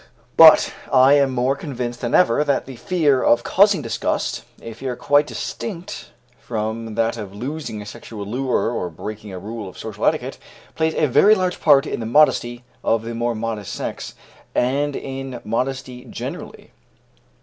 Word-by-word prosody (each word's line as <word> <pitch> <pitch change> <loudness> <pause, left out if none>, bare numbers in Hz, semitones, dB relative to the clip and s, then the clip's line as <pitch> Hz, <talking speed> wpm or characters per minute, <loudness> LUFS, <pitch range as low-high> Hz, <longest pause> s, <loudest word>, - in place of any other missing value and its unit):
But 160 -1 +8 0.2
I 130 +1 +6
am 140 -2 +4
more 130 +2 +1
convinced 125 -5 -5
than 120 -2 0
ever 150 -5 +4
that 140 -2 0
the 130 - -9
fear 145 0 +1
of 120 0 +3
causing 195 -5 +3
disgust 115 -1 -2 0.2
a 115 - -8
fear 125 +2 -5
quite 145 +4 +2
distinct 180 0 -6 0.3
from 110 0 -4
that 115 +1 0
of 100 -3 -7
losing 125 -2 -5
a - - -13
sexual 105 0 -8
lure 125 +1 -1
or 90 -7 -3
breaking 105 +5 -8
a 95 - -6
rule 105 +1 -6
of - - -15
social - - -7
etiquette - - -1 0.3
plays 160 0 0
a 155 - +2
very 200 - +5
large 185 -2 -2
part 140 -3 +5
in - - -4
the 115 - -4
modesty 120 -2 +3 0.2
of 115 0 +1
the 115 +1 -5
more 120 0 -1
modest 110 -2 -4
sex, - - -5 0.4
and 140 +3 +1
in 135 -2 -6
modesty 125 +2 -3
generally. 120 - -8
125 Hz, 165 wpm, -21 LUFS, 115-145 Hz, 0.4 s, But